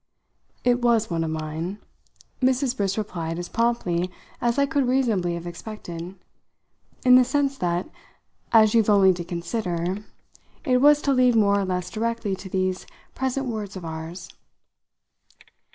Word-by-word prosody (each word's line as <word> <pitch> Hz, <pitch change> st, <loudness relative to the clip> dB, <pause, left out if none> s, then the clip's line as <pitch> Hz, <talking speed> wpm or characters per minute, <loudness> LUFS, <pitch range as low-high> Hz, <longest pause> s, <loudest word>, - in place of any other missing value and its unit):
"It 245 Hz, 0 st, +2 dB
was 230 Hz, -4 st, +2 dB
one 165 Hz, -1 st, 0 dB
of 160 Hz, -, -2 dB
mine," 160 Hz, +4 st, -4 dB, 0.6 s
Mrs. 260 Hz, 0 st, +2 dB
Briss 195 Hz, -3 st, -1 dB
replied 170 Hz, -6 st, -3 dB
as 175 Hz, 0 st, -4 dB
promptly 185 Hz, -7 st, 0 dB, 0.3 s
as 235 Hz, +1 st, +1 dB
I 280 Hz, -, +4 dB
could 280 Hz, -3 st, 0 dB
reasonably 220 Hz, -10 st, +1 dB
have 170 Hz, 0 st, -7 dB
expected; 175 Hz, -1 st, -7 dB, 0.9 s
"in 250 Hz, 0 st, +8 dB
the 255 Hz, -, +6 dB
sense 275 Hz, +2 st, 0 dB
that 175 Hz, 0 st, -1 dB, 0.6 s
as 220 Hz, -2 st, +6 dB
you've 225 Hz, -2 st, +3 dB
only 195 Hz, -2 st, +6 dB
to 175 Hz, -1 st, -5 dB
consider 175 Hz, +1 st, -3 dB, 0.7 s
it 255 Hz, -3 st, +3 dB
was 295 Hz, +1 st, +6 dB
to 280 Hz, -, +2 dB
lead 250 Hz, -2 st, +4 dB
more 200 Hz, -2 st, +4 dB
or 195 Hz, -, -1 dB
less 180 Hz, -1 st, -3 dB
directly 225 Hz, -2 st, -2 dB
to 190 Hz, -, -9 dB
these 185 Hz, 0 st, -1 dB, 0.3 s
present 265 Hz, +1 st, -2 dB
words 215 Hz, -5 st, -4 dB
of 185 Hz, -3 st, -7 dB
ours." 160 Hz, +2 st, -7 dB
200 Hz, 150 wpm, -24 LUFS, 175-245 Hz, 0.9 s, in